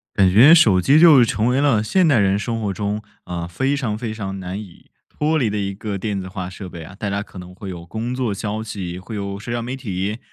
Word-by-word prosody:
感 95 -2 +4
觉 125 - +8
手 110 - +5
机 140 - +4
就 155 -7 +8
成 110 -1 0
为 125 +2 +2
了 140 -7 +3
现 180 - +2
代 145 -7 +4
人 100 -1 +2
生 115 +1 -3
活 105 -3 -2
中， 105 +2 -3 0.2
呃， 85 -1 -5
非 130 +11 0
常 120 -7 -2
非 115 -1 -4
常 95 -3 -5
难 95 +2 -5
以 95 -5 -14 0.2
脱 155 +1 0
离 120 - +1
的 105 - -3
一 100 -1 -2
个 100 0 -5
电 100 0 -3
子 95 - -7
化 95 -1 -6
设 95 0 -8
备 85 -2 -9
啊。 95 +5 -11
大 105 +1 -4
家 100 +1 -2
可 95 - -12
能 90 0 -10
会 95 0 -8
有 85 -1 -8
工 115 +6 -4
作 125 -5 -1
消 105 +2 -4
息， 95 -5 -6
会 105 +4 -8
有 100 -1 -4
社 105 - -8
交 120 0 -2
媒 125 +3 -4
体， 105 -4 -3
105 Hz, 280 characters per minute, -21 LUFS, 95-120 Hz, 0.2 s, 觉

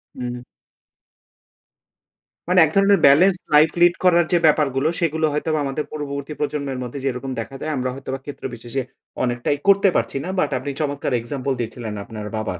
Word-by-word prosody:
হুম। 125 -1 -5 2.1
মানে 180 +1 +4
এক 155 - -4
ধরনের 195 0 +5
বেলেন্স 175 +7 +6 0.2
লাইফ 155 +2 +7
লিড 175 0 +6
করার 175 -2 +5
যে 175 - +4
ব্যাপারগুলো 145 -2 +3
সেগুলো 160 -2 +1
হয়তোবা 155 +1 0
আমাদের 140 +2 -3
পূর্ববর্তী 140 -1 -5
প্রজন্মের 140 -3 -3
মধ্যে 125 +3 -6
যেরকম 130 0 -3
দেখা 125 +4 -6
যায় 155 - -2
আমরা 130 0 -1
হয়তোবা 135 0 -6
ক্ষেত্রবিশেষে 125 -2 -5 0.4
অনেকটাই 120 +3 0
করতে 200 0 +5
পারছি 115 +4 0
না। 180 - -5
বাট - - +2
আপনি 135 +3 -4
চমৎকার 145 -1 -2
এক্সাম্পল 130 +3 -3
দিয়েছিলেন 115 -1 -5
আপনার 105 0 -8
বাবার। 110 -5 -3
140 Hz, 155 wpm, -21 LUFS, 125-155 Hz, 2.1 s, লাইফ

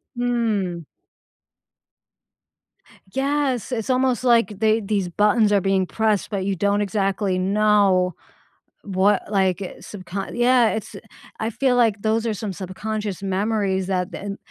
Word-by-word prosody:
Hmm. 225 -8 -1 2.3
Yes, 270 -2 -1
it's 225 -2 -3
almost 255 -1 +1
like 230 -4 +3
they 220 0 +2
these 200 -2 -1
buttons 210 +4 +2
are 200 - +3
being 195 0 +1
pressed, 220 -3 0
but 195 -3 -2
you 195 0 0
don't 200 +3 +1
exactly 195 -1 0
know 195 -2 +2 0.7
what, 195 0 +2
like, 190 -2 +1
uh, 190 - -3
subcon 190 -1 -7
yeah, 245 -1 +4
it's 220 - -5 0.4
I 220 - -1
feel 255 +2 +1
like 225 -4 +2
those 220 +1 0
are 225 - 0
some 205 -1 -5
subconscious 200 +2 -5
memories 195 -1 -1
that 185 0 -1
then 200 0 -6
205 Hz, 130 wpm, -22 LUFS, 190-225 Hz, 2.3 s, yeah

